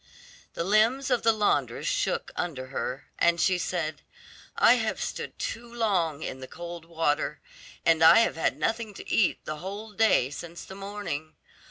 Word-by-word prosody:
The - - -1
limbs 225 +8 +3
of 245 - +3
the 230 - +5
laundress 215 -2 0
shook - - -1
under 130 -7 -4
her, 135 +1 -4
and 170 0 +3
she 185 +1 +3
said, 160 -4 -2 0.6
"I - - +7
have - - -1
stood - - -5
too 235 +1 -5
long 180 -10 0
in 130 - -5
the 130 - -8
cold 170 +1 -8
water, 165 -3 -1 0.5
and 165 -1 +4
I 165 +8 +9
have - - +1
had 165 - 0
nothing 225 -2 -2
to - - -9
eat 210 - +1
the 155 - -4
whole 200 +6 -7
day 205 - +3
since 170 +3 -8
the - - -10
morning. 195 -6 -5
175 Hz, 170 wpm, -27 LUFS, 160-215 Hz, 0.6 s, I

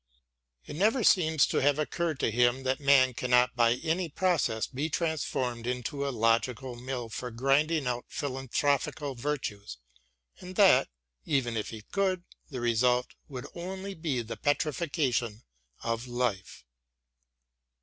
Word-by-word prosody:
It - - -8
never 220 - +2
seems 160 -6 +4
to - - -2
have 145 +1 +3
occurred 155 0 -2
to - - +1
him 120 +3 +2
that 130 0 0
man 140 -3 +5
cannot 125 0 +2
by 120 0 +4
any 170 +1 0
process 155 -10 +1
be 145 +5 -3
transformed 130 -7 -2
into 125 +3 -2
a - - 0
logical 115 +1 0
mill 125 0 -5
for 125 +3 -5
grinding 135 +6 +1
out 125 -1 -2
philanthropical 140 +1 -1
virtues, 115 - -4 0.6
and 185 +1 -9
that, 190 -11 +6 0.4
even 130 -5 0
if 110 - -2
he 110 -2 -8
could, 190 - -1 0.3
the 130 -4 -5
result 125 +1 +2
would 130 -5 -7
only 190 +3 -6
be 155 -8 -2
the 115 - -7
petrification 145 - -1 0.4
of 115 +1 -2
life. 120 - -3
130 Hz, 135 wpm, -29 LUFS, 120-155 Hz, 0.6 s, that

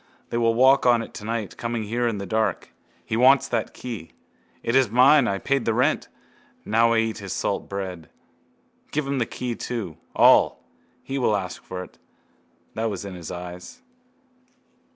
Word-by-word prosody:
They 120 - -1
will 115 -1 +2
walk 130 +2 +5
on 120 -2 +4
it - - -11
tonight, 110 -1 -4
coming 115 -1 -3
here 120 +3 -1
in 115 -3 -1
the 100 - -5
dark. 110 +3 -1 0.3
He 110 - -2
wants 130 +3 +5
that 115 -3 -2
key. 110 -10 -7 0.5
It 115 - 0
is 130 -4 +4
mine. 130 +3 +5
I 100 - 0
paid 140 +4 0
the 115 - 0
rent. 130 +6 +1 0.6
Now 115 +2 +3
I - - +2
eat 115 -1 0
his 100 -2 -5
salt - - -2
bread. 95 -5 -5 0.8
Give 150 -1 -1
him 140 -1 -1
the 115 - 0
key 125 -1 -4
too. 110 -8 -5 0.2
All. - - +5 0.4
He 135 +1 -3
will 110 -5 +2
ask 95 -2 -6
for 90 0 -6
it. - - -16 0.7
That 115 +1 -1
was 100 -1 -5
in 100 - -6
his 85 -3 -8
eyes. 90 - -9
115 Hz, 175 wpm, -24 LUFS, 100-125 Hz, 0.8 s, walk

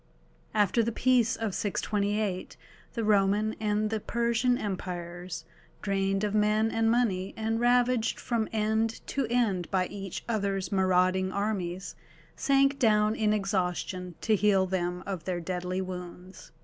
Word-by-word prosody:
After 210 +2 +3
the 230 +1 0
peace 245 -1 +3
of 220 -4 -3
628 205 -1 -1 0.4
the 230 - -1
Roman 210 +1 +3
and 210 0 0
the 220 - 0
Persian 235 +2 +1
Empires, 175 -4 -5 0.4
drained 195 0 0
of 210 -1 0
men 215 +1 +2
and 225 0 +2
money, 205 -6 +1
and 225 +1 -1
ravaged 245 -1 +2
from 230 -3 -1
end 220 +1 0
to 275 -4 -1
end 215 -8 +1
by 185 -1 +1
each 195 -1 -6
other's 195 -5 -1
marauding 185 -1 +2
armies, 190 -3 -2 0.4
sank 275 0 +2
down 215 -3 +3
in 215 -1 +1
exhaustion 185 -3 -1
to 220 - +3
heal 195 -2 +3
them 180 -1 -2
of 190 -5 -5
their 180 -2 -1
deadly 180 +2 -3
wounds. 180 0 -8
205 Hz, 135 wpm, -28 LUFS, 185-225 Hz, 0.4 s, After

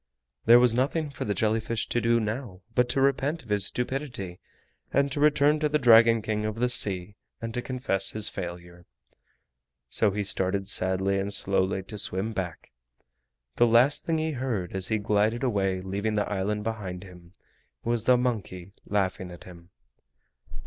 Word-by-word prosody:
There 115 +1 +8
was 125 -2 +4
nothing 145 +5 -1
for 140 - -5
the 100 - -1
jelly 110 +2 +1
fish 115 0 -2
to 120 - 0
do 115 0 +2
now 110 -3 -5
but 125 +1 +2
to 135 - 0
repent 140 +3 +1
of 115 - -18
his 100 -1 +1
stupidity, 125 -8 -4 0.5
and 140 +1 +1
to 145 - -3
return 150 0 +3
to 150 0 0
the 150 - +2
Dragon 115 -3 +6
King 105 -1 -2
of 110 0 -3
the 125 +2 0
Sea 100 -4 0 0.2
and 115 0 -6
to 125 - -2
confess 120 -7 0
his 110 -1 0
failure, 85 -1 -8 1.0
so 105 - +3
he 105 +1 -2
started 95 0 0
sadly 95 0 +2
and 100 +1 -3
slowly 95 -1 0
to 105 +2 -7
swim 100 +4 0
back. 90 -9 -6 0.9
The 120 - +5
last 120 +5 +4
thing 165 -1 0
he 160 0 -1
heard 120 - -3
as 95 -1 0
he 110 - 0
glided 105 +3 0
away, 95 -6 0
leaving 100 +3 -3
the 105 - 0
island 105 +1 -2
behind 100 -5 -5
him, 90 -2 -15 0.5
was 115 -1 -1
the 125 -1 +5
monkey 100 -7 -3
laughing 95 -2 -1
at 90 - -11
him. 85 -1 -14
105 Hz, 175 wpm, -26 LUFS, 95-125 Hz, 1.0 s, There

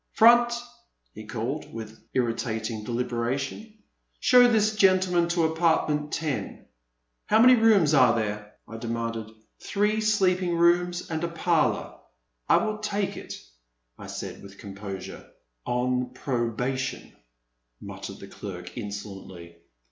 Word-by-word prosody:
Front!" 240 +1 +6 0.6
he 110 0 -10
called 120 +7 -4
with 110 -1 -9
irritating 115 -2 -2
delibera 120 +2 -1
tion, 140 +11 -6 0.5
"show 250 -1 +6
this 215 -2 +2
gentleman 185 -3 +3
to 170 -1 +1
apartment 160 -2 +1
ten." 155 -4 -3 0.3
*' - - -51
How 215 - +4
many 250 +2 +8
rooms 215 - +4
are 125 -5 +5
there! 105 -2 -3
" - - -47
I 115 - -8
demanded. 115 -1 -4 0.2
*' - - -48
Three 210 +2 0
sleeping 185 -4 +2
rooms 175 +1 +2
and 160 +1 -2
a - - +1
parlor." 165 -1 0 0.2
" - - -45
I - - +6
will 215 -1 -3
take 205 -2 -2
it," - - -7 0.6
I - - -9
said - - -7
with 100 0 -13
composure. 100 -1 -8 0.4
0n 125 +1 -1
probation," 125 +1 -3 0.6
muttered - - -8
the - - -11
clerk 90 -3 -8
insolently. 95 -5 -8
130 Hz, 135 wpm, -26 LUFS, 110-180 Hz, 0.6 s, many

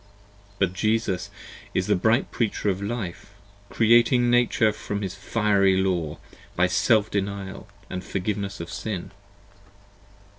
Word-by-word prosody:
But 95 -3 +1
Jesus 110 -2 0 0.5
is 95 - +1
the 105 - +2
bright 110 +7 +2
Preacher 110 -2 -1
of 95 +1 -4
Life, 100 -2 -5 0.3
Creating 120 +3 +4
Nature 120 -3 +3
from 105 -1 -4
this 95 -2 -3
fiery 100 -1 +2
Law, 90 -5 0 0.4
By 90 - +3
self 110 +3 +2
denial 100 0 -4 0.2
& - - -14
forgiveness 100 +1 -3
of 85 - -6
Sin. 105 -5 -4
100 Hz, 120 wpm, -25 LUFS, 95-110 Hz, 0.5 s, Creating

